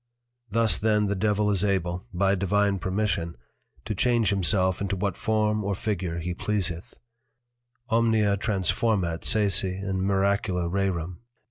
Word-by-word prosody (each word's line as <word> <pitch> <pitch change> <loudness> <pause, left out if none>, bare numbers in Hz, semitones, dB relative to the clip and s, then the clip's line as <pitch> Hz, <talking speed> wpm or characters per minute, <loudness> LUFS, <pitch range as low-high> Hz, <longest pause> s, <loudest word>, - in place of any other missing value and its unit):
Thus 115 +2 +2
then 105 -1 +2
the 100 0 -1
Devil 105 +1 +1
is 100 -2 +1
able 95 0 -1
(by 95 +2 +1
Divine 100 +1 +1
Permission) 90 - -2 0.5
to 110 - -2
Change 115 +1 +2
himself 95 -1 +1
into 100 0 -1
what 95 -1 -2
form 110 -1 0
or 100 0 -1
figure 90 -5 -3
he 85 +1 -3
pleaseth, 90 -3 -3 0.9
_Omnia 110 -3 +3
transformat 95 -3 0
sese 100 -3 +3
in 95 0 -3
miracula 95 -2 0
rerum. 90 -2 -2
100 Hz, 130 wpm, -26 LUFS, 90-105 Hz, 0.9 s, Omnia